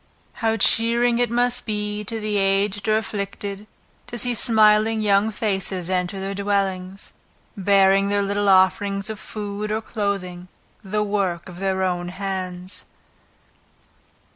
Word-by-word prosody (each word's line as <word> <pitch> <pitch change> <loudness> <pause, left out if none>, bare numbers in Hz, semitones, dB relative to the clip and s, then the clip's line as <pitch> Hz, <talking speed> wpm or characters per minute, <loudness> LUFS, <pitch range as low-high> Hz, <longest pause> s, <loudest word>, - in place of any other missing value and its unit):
How 225 -1 +1
cheering 235 +3 +3
it 245 -1 +2
must 245 +1 +1
be 210 -1 -2
to 225 +2 -3
the 210 -1 -1
aged 195 +1 +1
or 215 0 +3
afflicted, 200 -1 -5 0.4
to 240 - -6
see 245 +2 +1
smiling 220 -1 +4
young 205 +1 +3
faces 190 -4 -2
enter 185 +1 -1
their 195 +1 -3
dwellings, 195 -1 -2 0.4
bearing 195 0 +3
their 205 0 +1
little 200 0 0
offerings 195 +2 +3
of 215 - -8
food 210 0 -5
or 215 - 0
clothing, 195 -5 -4 0.4
the 210 +2 -1
work 195 -5 -1
of 180 -1 -10
their 190 -1 0
own 175 -1 -1
hands. 185 -1 -5
200 Hz, 135 wpm, -22 LUFS, 190-215 Hz, 0.4 s, smiling